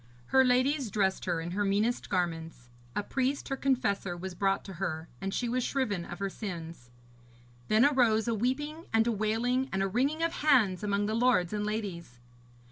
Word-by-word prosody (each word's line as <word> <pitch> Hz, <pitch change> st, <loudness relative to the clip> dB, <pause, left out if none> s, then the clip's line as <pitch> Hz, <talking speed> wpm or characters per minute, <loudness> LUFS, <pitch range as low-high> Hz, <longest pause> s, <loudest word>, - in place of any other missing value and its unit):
Her 265 Hz, 0 st, +6 dB
ladies 255 Hz, +1 st, +2 dB
dressed 195 Hz, -2 st, 0 dB
her 175 Hz, -2 st, 0 dB
in 165 Hz, +1 st, -5 dB
her 205 Hz, +3 st, 0 dB
meanest 205 Hz, +4 st, 0 dB
garments; 165 Hz, -8 st, -2 dB, 0.3 s
a 205 Hz, -, 0 dB
priest, 265 Hz, +5 st, -1 dB
her 270 Hz, -, 0 dB
confessor, 240 Hz, -10 st, 0 dB
was 190 Hz, +1 st, -6 dB
brought 195 Hz, +2 st, 0 dB
to 195 Hz, -, -7 dB
her, 160 Hz, -3 st, -2 dB
and 195 Hz, -, -2 dB
she 240 Hz, -, -1 dB
was 250 Hz, +1 st, 0 dB
shriven 210 Hz, -12 st, -1 dB
of 175 Hz, -, -7 dB
her 195 Hz, -, -2 dB
sins. 170 Hz, -, -7 dB, 0.8 s
Then 220 Hz, +4 st, +5 dB
arose 240 Hz, -6 st, +3 dB
a 230 Hz, -, +1 dB
weeping 295 Hz, +8 st, -2 dB
and 225 Hz, 0 st, +3 dB
a 235 Hz, -, +2 dB
wailing 230 Hz, +5 st, 0 dB
and 195 Hz, 0 st, 0 dB
a -, -, +1 dB
wringing 275 Hz, -, 0 dB
of 330 Hz, -, +2 dB
hands 240 Hz, -12 st, +4 dB
among 205 Hz, 0 st, 0 dB
the 215 Hz, -, -1 dB
lords 225 Hz, -6 st, +2 dB
and 210 Hz, 0 st, -1 dB
ladies. 190 Hz, -, -4 dB
215 Hz, 190 wpm, -30 LUFS, 190-255 Hz, 0.8 s, Her